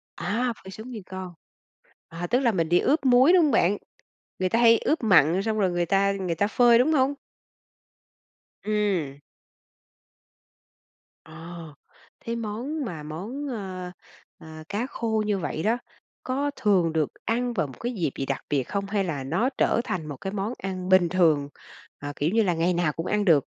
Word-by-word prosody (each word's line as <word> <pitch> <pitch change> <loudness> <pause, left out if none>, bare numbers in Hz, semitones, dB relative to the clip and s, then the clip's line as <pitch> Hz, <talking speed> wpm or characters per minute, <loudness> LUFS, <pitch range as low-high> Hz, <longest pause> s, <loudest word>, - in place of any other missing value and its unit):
À, 235 +6 -1
phải 190 - -10
xuống 220 +5 -9
nguyên 220 -5 -7
con. 185 -1 -7 0.8
À, 170 +1 -5
tức 245 - +2
là 250 -4 +2
mình 165 -6 -1
đi 175 +1 +4
ướp 290 +1 +1
muối, 260 +6 +6
đúng 360 -2 +6
hông 300 - +3
bạn? 205 -3 +3 0.6
Người 185 0 +1
ta 230 - +1
hay 230 -1 +6
ướp 310 -4 0
mặn 180 -3 +5
xong 220 0 -1
rồi 190 -3 +2
người 175 0 0
ta 195 +3 +2
người 190 -4 -2
ta 200 +5 +1
phơi, 240 +1 +5
đúng 270 +6 +3
không? 275 -1 +3 1.5
Ừm. 200 -10 -1 2.1
Ồ, 160 - -16 0.9
thế 230 - -4
món 235 +7 -4
mà 165 -8 -6
món, 205 - -6
ơ, 190 -7 -5 0.5
ờ, - - -14 0.2
cá 215 +4 -1
khô 220 -4 -1
như 210 -1 0
vậy 155 -1 -3
đó 225 +4 +2 0.5
có 280 +3 -1
thường 190 -8 +2
được 155 -3 +1 0.2
ăn 240 +2 0
vào 155 - 0
một 130 - -13
cái 240 +1 -3
dịp 175 - -1
gì 135 - -2
đặc 135 0 -3
biệt 140 -3 +1
không? 200 +9 -3
Hay 200 0 0
là 155 -7 -3
nó 175 - 0
trở - - +2
thành 180 -9 -3
một 145 -3 -7
cái 195 +8 -5
món 205 +3 -2
ăn 185 -1 -5
bình 185 -2 +5
thường, 160 -6 +2 0.5
à, 145 0 -6
kiểu 150 - 0
như 225 0 +4
là 180 -4 +1
ngày 170 +2 +1
nào 170 -3 +1
cũng 165 - -5
ăn 210 +1 0
được? 155 -7 +4
195 Hz, 190 wpm, -25 LUFS, 170-230 Hz, 2.1 s, muối